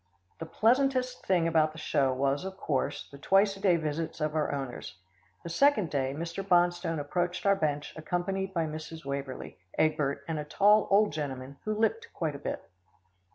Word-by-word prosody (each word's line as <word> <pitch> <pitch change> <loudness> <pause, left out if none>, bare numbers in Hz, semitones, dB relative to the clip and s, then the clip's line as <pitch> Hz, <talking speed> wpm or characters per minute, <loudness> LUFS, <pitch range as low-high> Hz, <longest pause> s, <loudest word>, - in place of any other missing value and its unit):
The 165 - -5
pleasantest 255 +3 +1
thing 175 -3 +3
about 155 -2 +2
the - - -12
show 135 -3 +1
was, 135 +3 0
of 190 0 -6
course, 140 -8 -2
the 140 - -11
twice 195 +5 +3
a - - -12
day 190 -3 +4
visits 160 0 -3
of 155 -1 -1
our 155 -1 0
owners. 135 -7 -5 0.5
The - - -6
second 215 - +3
day, 135 -1 -1
Mr. 170 +4 -4
Bonstone 175 -3 +2
approached 175 +6 -2
our 200 0 +5
bench 150 -5 -2
accompanied 185 +4 -2
by 170 -3 0
Mrs. 155 0 -7
Waverlee, 140 -7 -5 0.2
Egbert 145 -3 +1
and 160 -2 -2
a - - -3
tall 205 +7 +4
old 205 +2 +4
gentleman 140 -2 -5
who 215 0 -1
limped 455 - 0
quite 160 -3 -1
a 140 - -7
bit. - - -5
165 Hz, 180 wpm, -29 LUFS, 145-195 Hz, 0.5 s, our